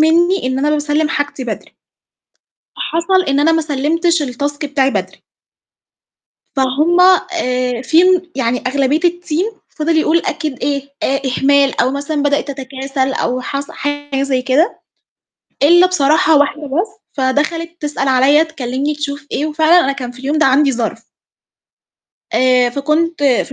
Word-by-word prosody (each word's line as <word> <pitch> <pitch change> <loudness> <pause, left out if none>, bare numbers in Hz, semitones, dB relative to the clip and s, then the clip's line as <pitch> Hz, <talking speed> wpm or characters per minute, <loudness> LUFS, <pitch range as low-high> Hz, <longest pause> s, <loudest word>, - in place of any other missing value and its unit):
منّي 340 +1 +3
إن 260 0 -1
أنا 290 +2 +1
باسلِّم 300 +1 0
حاجتي 290 -3 -3
بدري، 220 - -7 1.0
فحصل 375 -5 0
إن 275 +1 +2
أنا 320 +3 +3
ما 325 0 +2
سلِّمتش 315 +3 0
الtask 285 +2 -3
بتاعي 275 -2 +1
بدري. - - -4 1.3
فهُم 290 +7 +2 0.3
آآ 250 -6 -1
في 320 +5 +4 0.3
يعني 250 -2 -1
أغلبية 275 +3 +1
الteam 350 +4 -1
فِضِل 320 +1 -1
يقول 315 +1 +2
أكيد 305 -5 -3
إيه، 280 +1 -1 0.2
آآ، 275 +1 0
إهمال 275 +1 +2
أو 255 - +2
مثلًا 285 +2 -3
بدأت 285 0 0
تتكاسل 270 0 -3
أو 255 -1 -2
حصل 275 +2 -5
حاجة 290 -1 -3
زي 265 -2 0
كده، 280 - +1 0.8
إلَّا 350 +5 +6
بصراحة 310 -2 +3
واحدة 290 +1 +1
بس، 355 +10 -3
فدَخَلِت 300 +5 -1
تسأل 295 -2 -2
عليَّ 270 +4 +4
تكلِّمني 280 -1 -3
تشوف 285 -1 -5
إيه 290 - -1
وفعلًا 315 +3 +4
أنا 275 - +1
كان 250 -3 -6
في 245 - -16
اليوم 280 +4 -1
ده 315 - +3
عندي 275 +1 +3
ظَرْف. 230 -2 -3 1.3
آآ، 250 -1 +3
فكنت 305 +4 -1
في 275 0 +1
285 Hz, 145 wpm, -16 LUFS, 265-315 Hz, 1.3 s, إلَّا